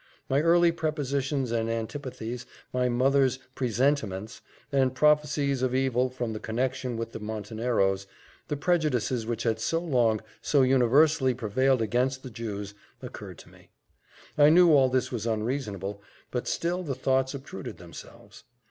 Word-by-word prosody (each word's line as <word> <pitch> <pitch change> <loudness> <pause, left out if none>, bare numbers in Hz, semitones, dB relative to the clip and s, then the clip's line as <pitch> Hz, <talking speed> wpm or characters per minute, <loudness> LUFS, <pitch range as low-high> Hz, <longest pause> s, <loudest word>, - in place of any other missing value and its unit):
My 135 +2 +2
early 170 +1 +5
prepossessions 140 -5 -2
and 115 -1 0
antipathies, 120 0 -5 0.3
my 125 0 +1
mother's 130 +1 +2 0.2
presentiments, 120 -5 -1 0.3
and 130 -2 +2
prophecies 150 -2 +2
of 130 0 0
evil 130 -1 +1
from 125 -3 -4
the 110 - -5
connexion 125 +2 -2
with 115 0 -4
the - - -7
Monteneros, 105 -2 -1 0.4
the 150 - -2
prejudices 135 -8 0
which 115 -1 -2
had 110 -1 0
so 165 +8 0
long, 120 -10 +2 0.2
so 140 -3 +3
universally 130 +2 +4
prevailed 130 +2 +1
against 130 +4 0
the 130 - -8
Jews, 105 -2 -5 0.3
occurred - - -8
to - - -14
me. - - -20 0.7
I 145 0 +8
knew 175 +1 +6
all 135 -3 +5
this 130 0 0
was 115 -2 -3
unreasonable, 105 -4 -3 0.3
but 125 - -3
still 175 +2 -1
the 145 -7 -3
thoughts 130 +1 0
obtruded 130 -8 -8
themselves. 85 -2 -13
130 Hz, 145 wpm, -27 LUFS, 115-140 Hz, 0.7 s, I